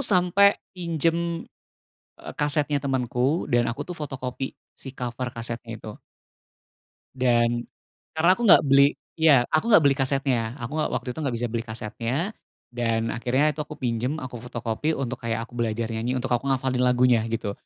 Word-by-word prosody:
sampai 200 -3 +4 0.2
pinjam, 170 -1 -1 0.7
eee, - - -10
kasetnya 145 0 +2
temanku 130 +2 0
dan 120 0 +3
aku, 115 - -3
tuh, - - -8
fotokopi 135 -3 -5 0.2
si 135 -1 -10
cover 125 0 -4
kasetnya 115 0 -4
itu. 110 -1 -9 1.2
Dan 120 -2 +1 0.5
karena 165 +3 +4
aku - - -5
nggak 170 - +8
beli 140 +1 +5 0.2
iya, 145 -6 +6
aku 155 - +3
nggak 205 -8 +7
beli 140 -1 +4
kasetnya, 130 -4 0
aku 120 +5 -5
nggak - - 0
waktu - - -3
itu - - -12
nggak 130 -6 -1
bisa 120 +1 -2
beli 115 -1 -2
kasetnya, 115 +1 -4 0.6
dan 115 -1 -1
akhirnya 130 +5 +1
itu 150 - -8
aku 150 0 -10
pinjem, 125 +1 -1
aku 125 -2 -7
fotokopi 125 +5 -2
untuk 130 -2 -4
kayak 115 -1 -2
aku 120 - -19
belajar 115 -1 -1
nyanyi, 115 +3 -2
untuk 125 0 -2
aku 120 +3 0
ngafalin 130 -1 0
lagunya, 125 -2 +4
gitu, 115 -3 -2
125 Hz, 165 wpm, -25 LUFS, 120-145 Hz, 1.2 s, nggak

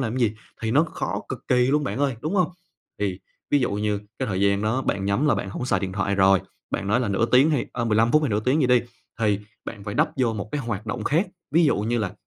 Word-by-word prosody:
làm 120 -1 -2
gì 115 -4 +2 0.3
thì 110 - 0
nó 150 +7 +4
khó - - -3
cực - - -4
kỳ 125 -1 +4
luôn 145 +2 +2
bạn 135 - -3
ơi, 140 -4 +1
đúng 155 +9 -2
hông? 180 -4 +3 0.5
Thì 95 -3 -1 0.3
ví 145 - +4
dụ 125 - +1
như 105 0 -1 0.2
cái 130 - -2
thời 95 -2 -1
gian 100 +1 +2
đó 115 +5 0
bạn 95 -5 -1
nhắm 100 +9 +1
là 150 - +4
bạn 95 - -3
hổng 125 - -4
xài 100 -7 +1
điện 95 -1 -3
thoại 100 +1 0
rồi, 95 -1 +5 0.3
bạn 100 - -2
nói 110 +5 +2
là 120 - -1
nửa 100 +4 +1
tiếng 130 +6 +5
hay, 145 -5 0
ờ, 120 -1 -2
15 115 +1 +2
phút 155 0 +5
hay 145 - +1
nửa 105 -1 0
tiếng 130 +7 +2
gì 130 - +3
đi, 125 -1 +5 0.4
thì 105 -2 +2 0.2
bạn 100 -3 -8
phải 105 - -4
đắp - - +2
vô 125 -4 +2
một 105 0 -5
cái 145 - -1
hoạt 110 -3 -4
động 110 -1 -3
khác, 165 +7 +2 0.2
ví 165 +4 +4
dụ 145 - +3
như 115 +3 0
là 100 -4 -2
115 Hz, 280 wpm, -24 LUFS, 100-130 Hz, 0.5 s, rồi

